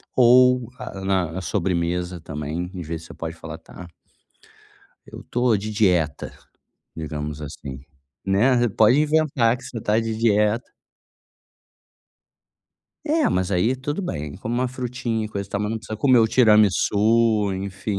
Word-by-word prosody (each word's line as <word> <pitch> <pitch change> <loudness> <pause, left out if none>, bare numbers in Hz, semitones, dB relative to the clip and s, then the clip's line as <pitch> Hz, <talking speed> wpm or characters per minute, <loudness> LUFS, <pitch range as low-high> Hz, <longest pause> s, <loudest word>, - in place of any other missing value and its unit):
ou 125 -1 +5
a 95 - -8
na 95 -2 -1
sobremesa 90 -1 -2
também 80 +3 -5
e 90 -2 -6
vê 80 0 -5
se 80 - -13
você - - -11
pode 80 0 -6
falar 80 -1 -8
tá 90 +1 -12 1.2
eu - - -10
tô 125 -3 +2
de 105 +2 -5
dieta, 90 -8 +1 0.7
digamos 75 -1 -5
assim, 70 -2 -8 0.4
né, 120 +5 +3
pode 110 +7 +4
inventar 150 -6 +2
que 125 - -14
você 115 - -6
tá 105 +1 +1
de 115 -1 -2
dieta. 110 +1 +1 2.3
É 315 0 +2
mas 90 0 -1
aí 100 +7 +2
tudo 145 +7 -4
bem, 75 - -5
come 110 +4 -4
uma 125 +1 0
"frutinha" 125 -3 -3
e - - -5
coisa 100 -2 -5
e - - -32
tal 100 - -2
mas 105 0 -2
não 115 - -2
precisa 110 -1 -7
comer 130 -2 +4
o 110 - +3
tiramissu, 105 -1 +3
enfim, 100 +1 -4
105 Hz, 150 wpm, -23 LUFS, 90-120 Hz, 2.3 s, ou